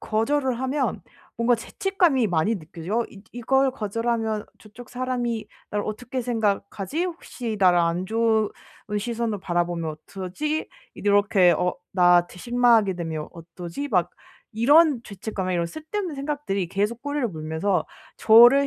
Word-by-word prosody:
거절을 255 +3 0
하면 265 +1 -1 0.4
뭔가 235 +1 +3
죄책감이 320 - +1
많이 180 +6 +1
느껴져요. 170 +7 -3
어 - - -6
이 195 - -13
'이걸 265 +3 +2
거절하면 225 0 -1
저쪽 225 +3 -13
사람이 245 -3 -2 0.2
나를 205 0 -1
어떻게 245 +4 -4
생각하지? 220 - -1
혹시 250 -10 -5
나를 180 -2 +5
안 170 +1 +1
좋은 220 -1 +2 0.5
시선으로 230 -1 -2
바라보면 175 -3 -1 0.2
어쩌지?' 200 - -3 0.3
이렇게 205 -3 +4
어 180 0 0 0.2
'나한테 175 -1 +4
실망하게 235 -3 +3
되면 160 -3 -4
어쩌지?' 170 - -7
막 180 -6 +1 0.4
이런 280 +4 +5
죄책감에 195 -2 -4
이런 170 -1 0
쓸데없는 315 - -5
생각들이 275 -10 -2
계속 205 +5 -1
꼬리를 285 -3 -1
물면서 160 +1 -1 0.3
저를 240 +5 +7
220 Hz, 320 characters per minute, -24 LUFS, 185-250 Hz, 0.5 s, 저를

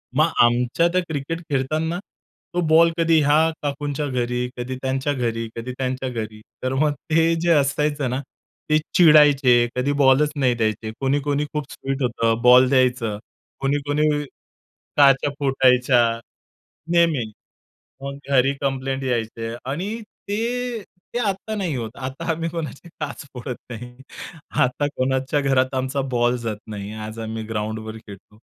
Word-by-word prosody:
मग 155 +3 +3
आमच्या 125 +7 +3
त्या 180 +1 +1
क्रिकेट 160 +3 -3
खेळताना 155 +5 -1 0.5
तो 175 - +1
बॉल 165 +1 +6
कधी 165 -1 +4
ह्या 150 +3 +4
काकूंच्या 145 0 -2
घरी, 125 -1 -1
कधी 125 +1 -4
त्यांच्या 135 +2 -1
घरी, 115 -3 -2
कधी 115 +2 -5
त्यांच्या 130 0 -2
घरी, 110 -2 -5 0.2
तर 130 +1 0
मग 150 +2 +2 0.2
ते 165 +1 +3
जे 170 - +1
असायचं 145 -1 +1
ना 130 +2 -2 0.5
ते 155 - +5 0.2
चिडायचे, 145 -7 +6
कधी 130 +3 0
बॉलच 140 +3 +5
नाही 130 -3 +2
द्यायचे, 110 -1 -1
कोणी 135 +1 +1
कोणी 145 +1 0
खूप 150 -2 -4
स्वीट 135 +1 -4
होतं, 115 -1 0
बॉल 125 +1 +7
द्यायचं. 125 -5 +2 0.4
कोणी 135 +1 +1
कोणी 150 +1 +2 0.9
काच्या 140 0 +5
फुटायच्या, 130 -2 +3 0.9
नेहमी. 160 -10 +2 0.7
मग 140 0 -5
घरी 135 0 +4
कंप्लेंट 135 -1 -2
यायचे 115 -2 -2 0.2
आणि 200 +10 -3 0.3
ते 235 +2 -2 0.3
ते - - 0
आता 195 +3 -3
नाही 180 -7 -2
होत 115 -2 -4
आता 135 +6 -5
आम्ही 165 +1 -1
कोणाची 165 0 -6
काच 145 -1 -5
फोडत 125 0 -5 0.2
नाही. 125 +1 -7 0.7
आता 135 +3 +1
कोणाच्या 130 +2 0
घरात 135 -1 +1
आमचा 130 +2 -1
बॉल 120 +1 +2
जात 115 -3 -3
नाही. 105 -1 -6
आज 110 +1 -7
आम्ही 110 0 -4
ग्राउंडवर 110 0 -4
खेळतो. 105 -1 -14
135 Hz, 145 wpm, -22 LUFS, 120-150 Hz, 0.9 s, बॉल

